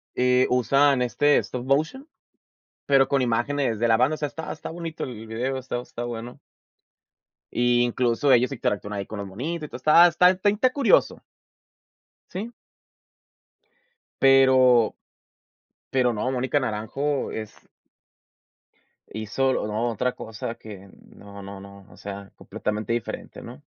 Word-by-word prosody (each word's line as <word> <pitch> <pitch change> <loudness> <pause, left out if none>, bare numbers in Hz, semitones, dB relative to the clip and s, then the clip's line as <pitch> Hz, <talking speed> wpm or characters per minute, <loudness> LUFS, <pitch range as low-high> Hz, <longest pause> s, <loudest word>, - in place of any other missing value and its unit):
eh, 125 0 +3
usan, 135 +2 +3
este, 145 +4 +3
stop 125 0 -3
motion, 160 - 0 0.8
pero 135 -1 +4
con 140 -1 +1
imágenes 120 0 0
de 120 - +1
la 115 - +5
banda, 130 +6 +2
o - - -5
sea, 150 - -2
está 160 +1 -7
está 155 - -8
bonito 165 -1 -6
el 115 -3 -8
video, 125 +4 -3
está 125 -1 -4
está 120 -1 -7
bueno. 120 0 -7 1.2
Y, 120 0 +3
incluso 120 +3 +1
ellos 125 +3 +4
interactúan 105 -5 -3
ahí 100 -1 -4
con 110 +1 -7
los 100 - -5
monitos, 150 - -5
y - - -22
todo, 155 +4 +7
está 180 +2 +5
está 185 +2 +1
inte 225 +5 +2
curioso. 280 -4 +2 1.1
Sí. 215 +6 -6 1.7
Pero, 130 -3 +5 0.9
pero 125 -2 +1
no, 115 +4 -2
Mónica 130 +3 0
Naranjo 130 +5 -2
es 110 -1 -6 1.6
hizo 110 +5 -1
lo - - -2
no 110 +3 -1
otra 125 +3 -1
cosa 110 +1 -6
que 100 -3 -12 0.3
no, 100 0 -12
no, 100 0 -9
no, 100 0 -13
o - - -17
sea, 100 0 -8
completamente 105 +2 -4
diferente, 120 - -5
¿no? - - -11
125 Hz, 140 wpm, -24 LUFS, 110-140 Hz, 1.7 s, todo